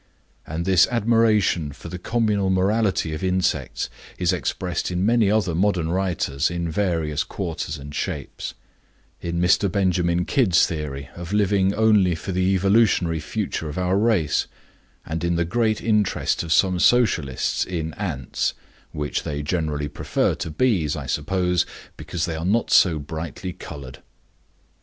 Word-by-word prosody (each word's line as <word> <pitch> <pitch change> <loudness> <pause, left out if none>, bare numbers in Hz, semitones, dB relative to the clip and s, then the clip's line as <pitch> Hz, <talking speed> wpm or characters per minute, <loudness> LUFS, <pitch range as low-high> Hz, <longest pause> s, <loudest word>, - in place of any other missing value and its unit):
And 80 +2 -3
this 95 -2 +5
admiration 110 -9 +2
for - - -11
the 90 - -6
communal 105 -2 0
morality 95 -3 +1
of 75 - -5
insects 90 -7 0 0.3
is 90 0 +1
expressed 90 0 -2
in 90 +1 -1
many 115 -2 +3
other 100 -5 +1
modern 90 -2 +1
writers 85 -6 0
in 85 -1 -3
various 80 -5 0
quarters 80 -4 -4
and 70 +1 -9
shapes; 75 -4 -4 0.7
in 85 0 -2
Mr. 90 +2 +3
Benjamin 90 -2 +1
Kidd's 110 - +3
theory 70 -4 -5
of 85 +2 -7
living 100 -1 +2
only 105 -5 +4
for 80 +4 -5
the 95 +1 +2
evolutionary 95 -4 +3
future 85 -2 -3
of 75 - -7
our 90 +1 +1
race, 100 -7 +2 0.6
and 80 +2 -4
in 85 0 +1
the 85 0 +1
great 110 +3 0
interest 105 -3 +1
of 85 -2 -5
some 90 +1 +3
Socialists 85 - +2
in 80 -3 -4
ants, 80 -12 -2 0.4
which 75 -1 -2
they 75 0 -4
generally 75 -2 -1
prefer 70 - 0
to - - -5
bees, 85 - +1
I 75 -3 -5
suppose, 90 +6 0 0.3
because 85 -2 -3
they 85 -2 -3
are 80 - -4
not 110 +6 +1
so 85 -4 +5
brightly 80 +4 -6
colored. 70 -5 -9
90 Hz, 145 wpm, -23 LUFS, 80-100 Hz, 0.7 s, this